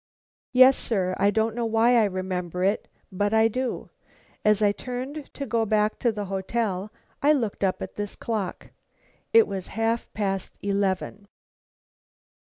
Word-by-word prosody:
"Yes, 255 +1 +7
sir. 185 -5 0
I 200 - +4
don't 220 +2 +1
know 235 0 -1
why 225 +2 +4
I 225 -2 +5
remember 185 -2 -3
it, 200 +3 +1 0.2
but 205 +3 0
I 220 0 +5
do. 255 +3 -3 0.5
As 210 -1 +4
I 205 - +5
turned 260 +6 -6
to 280 - -4
go 230 -3 +1
back 215 0 +1
to 235 - +2
the 210 -2 -4
hotel, 195 +1 -2 0.3
I 295 +2 +5
looked 230 -9 -2
up 190 -1 0
at - - -9
this 205 -1 -3
clock. 215 -5 -4 0.6
It 455 -1 +7
was 190 -2 -5
half 225 +1 0
past 195 -3 -3
eleven." 200 0 -1
210 Hz, 155 wpm, -25 LUFS, 195-235 Hz, 0.6 s, Yes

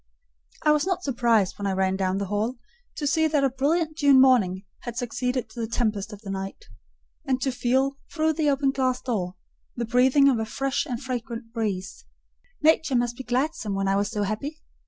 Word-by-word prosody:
I 300 - +5
was 300 +3 +2
not 365 -1 -1
surprised, 235 -8 +1
when 200 - -2
I 195 - 0
ran 190 0 +1
down 190 -1 0
into 200 - -1
the - - -10
hall, 215 +5 -1 0.4
to 295 - -3
see 320 +2 +3
that 295 -2 +1
a 270 - +2
brilliant 310 +4 0
June 280 -3 +6
morning 210 -8 +4
had 240 -1 -7
succeeded 250 +1 -2
to 235 - -9
the 225 - -2
tempest 215 -3 -1
of 210 -1 -10
the 195 - -5
night; 195 0 -5 0.6
and 260 -1 0
to 270 - +1
feel, 265 +3 0
through 315 -1 +1
the 305 -1 +1
open 275 -1 +2
glass 255 -2 0
door, 185 -8 -3 0.4
the 235 - -2
breathing 255 +4 +4
of 255 -5 +3
a 220 - -1
fresh 270 +6 -2
and 245 -1 -4
fragrant 235 -2 -5
breeze. 205 -5 -3 0.6
Nature 315 -3 +4
must 240 0 +1
be 260 - -7
gladsome 250 -4 -1
when 195 0 0
I 195 - +2
was 200 +1 +1
so 210 -2 -2
happy. 275 +10 -4
245 Hz, 205 wpm, -25 LUFS, 210-275 Hz, 0.6 s, June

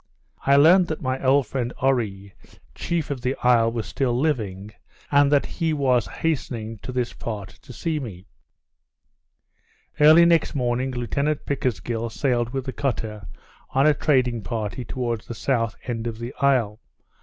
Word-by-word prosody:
I 140 - +6
learnt 170 +6 +6
that 155 -2 -4
my 130 +1 -2
old 135 +1 +4
friend 125 +1 -3
Oree, 105 -7 0 0.4
chief 165 -4 -2
of 135 -3 -4
the 130 +2 -1
isle, 115 -2 +4
was 115 -2 -3
still 120 +3 -1
living, 105 -9 -2 0.4
and 145 0 +4
that 145 -1 +3
he 165 -2 -2
was 130 -6 +2
hastening 115 -7 -3
to 130 - -7
this 125 -1 -2
part 105 -5 -6
to - - -13
see 155 +5 -2
me. 100 -9 -8 1.7
Early 155 +3 +8
next 170 -2 +3
morning, 125 0 0
Lieutenant 140 +4 -2
Pickersgill 115 - -2
sailed 120 -1 0
with 135 +1 -4
the 130 - -4
cutter, 110 -6 -3 0.5
on 135 +2 +4
a 155 - +6
trading 130 -6 +1
party, 110 +2 -4
toward 120 -3 -3
the 120 - -8
south 115 -3 0
end 120 -2 -3
of 115 -1 -4
the 120 +2 -6
isle. 120 -6 +2
125 Hz, 155 wpm, -23 LUFS, 115-140 Hz, 1.7 s, Early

